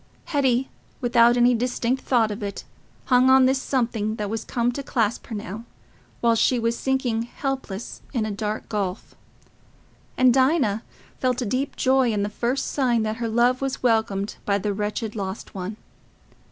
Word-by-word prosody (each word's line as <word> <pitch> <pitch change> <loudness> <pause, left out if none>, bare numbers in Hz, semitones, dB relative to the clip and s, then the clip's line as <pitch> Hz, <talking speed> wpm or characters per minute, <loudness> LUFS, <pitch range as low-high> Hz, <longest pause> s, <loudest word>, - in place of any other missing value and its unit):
Hetty, 265 -3 +1 0.3
without 240 -1 +4
any 245 +1 +5
distinct 245 +1 -1
thought 230 -4 +2
of 210 +2 -6
it, 200 -1 -5 0.4
hung 255 0 +4
on 265 0 +7
this 265 +1 +2
something 230 -6 -1
that 210 -2 -4
was 220 0 -3
come 240 0 0
to 280 - -5
clasp 230 -5 -1
her 225 - -5
now, 210 +1 -6 0.6
while 235 -1 +4
she 245 +3 +3
was 230 0 0
sinking 260 -3 0
helpless 240 -3 -5
in 235 -5 -1
a 215 - -3
dark 210 +1 -3
gulf; 200 -3 -3 1.0
and 255 -1 +5
Dinah 260 -6 +2 0.4
felt 255 0 0
a - - -3
deep 255 +6 -2
joy 260 -2 +3
in 205 -2 0
the 205 - -1
first 240 +5 -1
sign 245 -5 +1
that 215 0 -2
her 235 -2 -2
love 240 +3 +2
was 270 -1 -3
welcomed 220 -4 +1
by 200 -1 +1
the 205 +1 -2
wretched 210 +2 -3
lost 195 -1 -5
one. 195 +2 -5
235 Hz, 170 wpm, -24 LUFS, 215-255 Hz, 1.0 s, on